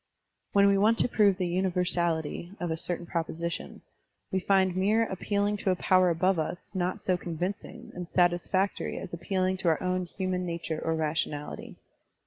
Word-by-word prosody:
When 200 Hz, 0 st, +6 dB
we 200 Hz, 0 st, +4 dB
want 220 Hz, +3 st, +4 dB
to -, -, +2 dB
prove 205 Hz, -5 st, +3 dB
the 185 Hz, -, -1 dB
tmiversality 175 Hz, -1 st, -1 dB
of 175 Hz, -2 st, -2 dB
a -, -, 0 dB
certain 175 Hz, +1 st, -4 dB
proposition, 170 Hz, 0 st, -4 dB, 0.5 s
we 190 Hz, -, +1 dB
find 190 Hz, -1 st, +2 dB
mere 210 Hz, +4 st, +3 dB
appealing 205 Hz, +1 st, -1 dB
to 200 Hz, -, -1 dB
a 185 Hz, -, +3 dB
power 185 Hz, 0 st, +4 dB
above 175 Hz, +2 st, +2 dB
us 165 Hz, +5 st, -4 dB
not 180 Hz, -1 st, -1 dB
so 185 Hz, -, +1 dB
convincing 175 Hz, +3 st, -5 dB
and 180 Hz, -1 st, -6 dB
satisfactory 180 Hz, +2 st, +1 dB
as -, -, -7 dB
appealing 185 Hz, +2 st, 0 dB
to 185 Hz, -, -3 dB
our 160 Hz, -2 st, +3 dB
own 185 Hz, 0 st, 0 dB
human 185 Hz, 0 st, -2 dB
nature 170 Hz, -2 st, -3 dB
or 160 Hz, -, 0 dB
rationality. 155 Hz, -1 st, -3 dB
180 Hz, 165 wpm, -28 LUFS, 170-190 Hz, 0.5 s, When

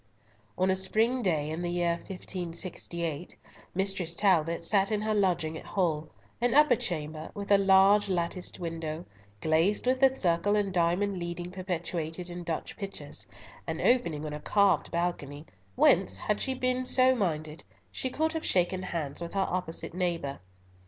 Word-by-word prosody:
On 185 Hz, +1 st, +2 dB
a -, -, +2 dB
spring 220 Hz, +7 st, +1 dB
day, 155 Hz, -7 st, 0 dB
in 160 Hz, +2 st, -3 dB
the 175 Hz, -, -2 dB
year 175 Hz, -1 st, +1 dB
1568, 175 Hz, -3 st, -4 dB, 0.4 s
Mistress 190 Hz, -3 st, 0 dB
Talbot 170 Hz, -5 st, +2 dB
sat 195 Hz, +3 st, +3 dB
in 210 Hz, -, +1 dB
her 215 Hz, 0 st, +1 dB
lodging 175 Hz, -6 st, +1 dB
at -, -, -12 dB
Hull, 160 Hz, -5 st, -1 dB, 0.3 s
an 245 Hz, +1 st, +2 dB
upper 295 Hz, -4 st, +6 dB
chamber, 155 Hz, -5 st, -4 dB
with 200 Hz, 0 st, -5 dB
a 200 Hz, -, +7 dB
large 195 Hz, +1 st, +5 dB
latticed 180 Hz, 0 st, -2 dB
window, 165 Hz, -1 st, -4 dB, 0.4 s
glazed 165 Hz, +8 st, +2 dB
with 255 Hz, +1 st, +2 dB
the 265 Hz, 0 st, +5 dB
circle 180 Hz, 0 st, +2 dB
and 200 Hz, -2 st, 0 dB
diamond 180 Hz, +3 st, +1 dB
leading 175 Hz, +1 st, -5 dB
perpetuated 175 Hz, -2 st, -4 dB
in 175 Hz, 0 st, -6 dB
Dutch 165 Hz, -2 st, -4 dB
pictures, 200 Hz, -1 st, -7 dB, 0.4 s
and -, -, -3 dB
opening 170 Hz, -12 st, +2 dB
on 150 Hz, -, -4 dB
a 150 Hz, -, -5 dB
carved 200 Hz, +4 st, +2 dB
balcony, 165 Hz, -4 st, -3 dB, 0.3 s
whence, 95 Hz, +1 st, +4 dB
had 210 Hz, -, -1 dB
she 265 Hz, -1 st, -1 dB
been 255 Hz, 0 st, 0 dB
so 255 Hz, 0 st, +4 dB
minded, 155 Hz, -, -2 dB, 0.3 s
she 260 Hz, -, -2 dB
could 315 Hz, +5 st, 0 dB
have 320 Hz, -, -3 dB
shaken 185 Hz, 0 st, +1 dB
hands 165 Hz, -5 st, -4 dB
with 170 Hz, +3 st, -6 dB
her 195 Hz, -1 st, +2 dB
opposite 175 Hz, -3 st, -2 dB
neighbour. 170 Hz, -6 st, -2 dB
180 Hz, 160 wpm, -29 LUFS, 165-200 Hz, 0.4 s, a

